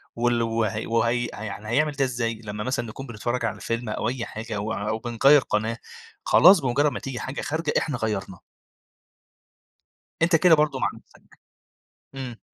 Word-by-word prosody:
وال 120 0 +1
وه 110 -2 -1
وهي 115 +1 +1
ها 110 - -8
يعني 105 0 -6
هيعمل 150 +6 +2
ده 140 -1 +1
إزاي؟ 115 -3 -2
لمّا 105 0 -4
مثلًا 125 -1 -2
نكون 135 +5 -8
بنتفرّج 120 +1 -3
على 110 - -3
فيلم، 115 0 -3
أو 110 +1 -1
أي 125 -1 -3
حاجة، 110 0 -6
أو 105 +2 -2
أو 110 +2 -2
بنغيّر 135 +5 +4
قناة، 110 0 -1 0.5
خلاص 185 +1 +7
بمُجرّد 140 +2 +1
ما 125 - -5
تيجي 130 -2 -5
حاجة 130 +2 -5
خارجة، 155 0 -2
إحنا 145 -5 -1
غيّرنا. 100 -5 -3 1.8
أنت 165 +1 +4
كده 165 0 +6
برضو 150 -1 +1
مع - - +1
نفسك - - -21 0.8
امم. 125 -3 -6
120 Hz, 170 wpm, -25 LUFS, 110-135 Hz, 1.8 s, خلاص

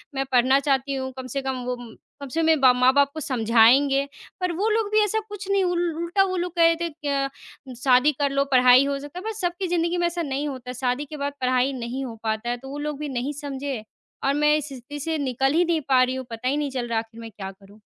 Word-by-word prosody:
मैं 270 0 -1
पढ़ना 260 +2 +4
चाहती 275 -1 0
हूँ, 260 -1 -3
कम 260 -1 -6
से 275 +3 -3
कम 265 -1 -3
वो 250 0 -2
म 240 -2 -11 0.3
कम 280 - -6
से 320 - -2
कम - - +1
मेरे 320 -1 +4
बा 260 -1 +8
माँ-बाप 260 +3 +4
को 315 - -5
समझाएँगे। 255 +2 +4 0.3
पर 365 -1 -1
वो 410 +6 0
लोग 435 -1 +1
भी 430 - +4
ऐसा 420 +1 0
कुछ 405 -2 -7
नहीं, 395 -1 +3
उल 350 -2 0
उल्टा 340 +4 +1
वो 375 -1 -2
लोग 355 0 -2
कह 340 - +4
रहे 330 0 +5
थे 320 -3 -4
अ, 275 -1 0 0.5
"शादी 260 +2 +5
कर 285 -1 +2
लो, 275 0 +2
पढ़ाई 255 +1 +6
हो 280 0 -1
सकता 290 +5 -8
है।" - - -10
पर 445 - -1
सबकी 365 -2 -2
ज़िंदगी 345 0 0
में 345 0 +2
ऐसा 345 0 -3
नहीं 285 -1 -2
होता, 255 -3 -6
शादी 250 +3 -1
के 300 +1 -9
बाद 285 0 -3
पढ़ाई 255 +1 +2
नहीं 255 +2 -4
हो 235 -3 -7
पाता 220 +1 -2
है। 245 - -1
तो 265 +2 -11
वो 280 - -6
लोग 295 -1 -4
भी 300 -1 -4
नहीं 260 +2 -3
समझे, 275 -4 -4 0.4
और 275 - +2
मैं 300 +1 +3
इस 300 -1 -4
स्थिति 275 +1 -9
से 320 +2 -2
निकल 270 -1 0
ही 345 +3 +3
नहीं 330 -2 0
पा 255 -1 +5
रही 255 +1 -1
हूँ, 260 0 -5
पता 230 +2 -4
ही 275 +3 +1
नहीं 295 -2 -2
चल 250 -2 -3
रहा, 230 -1 0
आखिर 225 +1 -10
मैं 225 -1 -9
क्या 195 -2 -7
करूँ। 200 +2 -19
275 Hz, 265 wpm, -24 LUFS, 250-320 Hz, 0.5 s, बा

